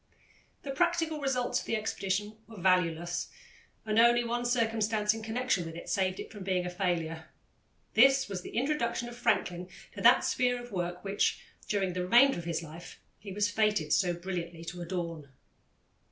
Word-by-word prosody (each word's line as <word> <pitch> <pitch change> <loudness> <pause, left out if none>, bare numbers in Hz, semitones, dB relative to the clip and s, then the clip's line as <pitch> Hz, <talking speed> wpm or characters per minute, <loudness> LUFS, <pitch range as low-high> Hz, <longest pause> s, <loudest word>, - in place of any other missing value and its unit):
The 275 - -4
practical 325 0 0
results 260 -3 0
of - - -9
the - - 0
expedition 210 -1 -2
were 220 -3 -11
valueless, 175 -1 +1 0.6
and 215 0 +2
only 240 +1 +5
one 240 +1 -2
circumstance 225 -3 +1
in 225 - -6
connection 225 -3 0
with 165 -1 -7
it 170 - -8
saved 190 -1 0
it - - -7
from 205 -3 -8
being 185 -1 0
a 180 - -3
failure. 165 -3 -2 0.7
This 270 +4 +5
was 195 -3 -4
the - - -7
introduction 240 -3 0
of 240 - -10
Franklin 180 -6 0 0.2
to - - -7
that - - +6
sphere 245 -1 +1
of 245 0 -10
work 175 -2 -3
which, 200 0 0 0.3
during 195 -3 0
the 180 - -2
remainder 240 +6 +5
of 170 - -8
his 170 -1 -2
life, 165 +2 -11 0.2
he 205 - -9
was 205 +1 0
fated 210 -8 +1
so 175 -2 +2
brilliantly 170 -2 -5
to 175 +1 -6
adorn. 170 -4 -4
200 Hz, 175 wpm, -30 LUFS, 175-235 Hz, 0.7 s, that